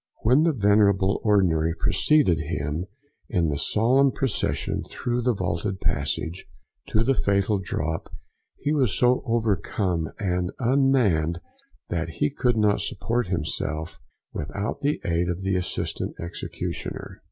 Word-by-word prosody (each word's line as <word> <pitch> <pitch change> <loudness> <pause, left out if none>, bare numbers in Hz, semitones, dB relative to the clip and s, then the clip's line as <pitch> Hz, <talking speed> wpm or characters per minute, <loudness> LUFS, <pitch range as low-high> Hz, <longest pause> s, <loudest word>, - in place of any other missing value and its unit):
When 130 +8 +5
the 165 - +4
venerable 100 -4 +3
ordinary 85 -6 +3
preceded 135 - +3
him 75 +2 -3 0.4
in 85 -7 +1
the 75 - -1
solemn 130 - +3
procession 130 -5 -1
through 120 0 -2
the 120 -1 +1
vaulted 95 +1 -2
passage 80 +2 -2 0.4
to 110 - +2
the 135 - +3
fatal 100 -3 +1
drop, 80 -3 -3 0.5
he 145 - -1
was 130 -9 +2
so 125 0 +3
overcome 100 -6 0
and 90 -2 -1
unmanned, 120 - +2 0.5
that 85 -1 -2
he 145 0 +1
could 125 -4 +1
not 105 -1 +3
support 120 -1 -1
himself 80 -2 -3 0.3
without 100 - -4
the 145 +1 0
aid 85 +1 +1
of 90 +2 -3
the 95 0 0
assistant 90 -1 -2
executioner. 85 +1 -6
100 Hz, 130 wpm, -25 LUFS, 85-120 Hz, 0.5 s, When